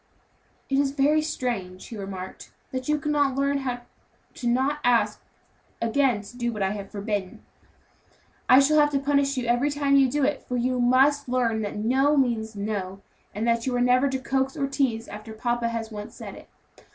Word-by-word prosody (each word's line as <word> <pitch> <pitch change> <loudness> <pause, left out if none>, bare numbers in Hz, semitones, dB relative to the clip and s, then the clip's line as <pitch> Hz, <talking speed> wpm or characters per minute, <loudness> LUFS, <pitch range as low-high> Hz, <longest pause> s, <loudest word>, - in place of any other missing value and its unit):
"It 270 0 +1
is 275 -1 +1
very 295 +2 +3
strange," 230 -12 -4
he 230 - -7
remarked, 195 -2 -7 0.2
"that 255 +1 -4
you 300 - +3
cannot 290 -3 +1
learn 280 0 0
not 245 -1 -3 0.5
to 260 +4 0
ask 245 -1 +2 0.6
to 230 -3 0
do 240 -1 -1
what 210 -3 -3
I 190 - +1
have 200 -1 -6
forbidden. 205 -2 -4 1.0
I 255 - +9
shall 305 +2 +4
have 295 0 +5
to 275 - +2
punish 280 0 +1
you 250 - -1
every 240 +4 +2
time 285 -1 +1
you 270 -1 +5
do 290 +3 0
it; 280 0 +1
for 250 - -4
you 250 +1 0
must 265 +3 +3
learn 235 -3 +1
that 205 - -4
no 265 +7 +2
means 230 -5 0
no, 200 -2 -4 0.3
and 220 +3 -1
that 235 +1 +1
you 255 - 0
are - - +1
never 250 +3 +3
to 265 - -1
coax 265 +1 -1
or 280 - 0
tease 260 -5 -1
after 215 +1 -9
papa 240 +1 -1
has 230 -1 -4
once 210 -1 -8
said - - -8
it. - - -13
250 Hz, 190 wpm, -25 LUFS, 220-275 Hz, 1.0 s, I